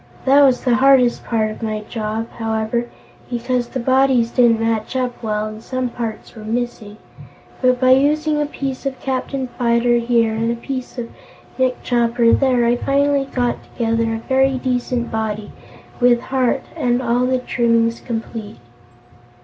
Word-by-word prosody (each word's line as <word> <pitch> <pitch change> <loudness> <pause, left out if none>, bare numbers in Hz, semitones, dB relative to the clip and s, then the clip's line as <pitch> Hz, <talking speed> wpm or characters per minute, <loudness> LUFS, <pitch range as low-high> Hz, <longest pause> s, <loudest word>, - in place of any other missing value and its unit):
That 275 +2 +6
was 265 -3 +4
the 250 - +2
hardest 260 -2 +4
part 220 -2 0
of 215 - -10
my 215 -1 -2
job, 220 +1 -4
however, 225 +1 -1 0.4
because 245 0 -1
the 260 - -5
bodies 260 -1 +2
didn't 235 -3 +4
match 225 +1 -1
up 250 -1 -2
well 215 -2 -1
and 215 0 -7
some 255 +1 -3
parts 230 -3 -6
were 220 - -11
missing. 225 -2 -4 0.6
But 255 -1 +3
by 255 0 +4
using 300 +3 +3
a 295 - -1
piece 275 -2 -4
of 265 -2 -5
Captain 265 0 -3
Fyter 240 0 +3
here 230 -1 +2
and 225 +1 0
a - - -1
piece 255 +2 -6
of 235 -1 -5 0.5
Nick 255 -1 0
Chopper 235 -1 +2
there, 255 -3 +3
I 240 +1 +2
finally 280 +1 +1
got 245 -2 -2
together 230 -1 -1
a 225 - -8
very 265 0 +2
decent 245 -1 -2
body, 215 -1 -3 0.5
with 245 -1 +4
heart 260 +1 0
and 245 -6 +1
all 245 0 +1
the 260 0 +2
trimmings 230 -2 +1
complete." 225 -2 -6
240 Hz, 160 wpm, -19 LUFS, 230-260 Hz, 0.6 s, That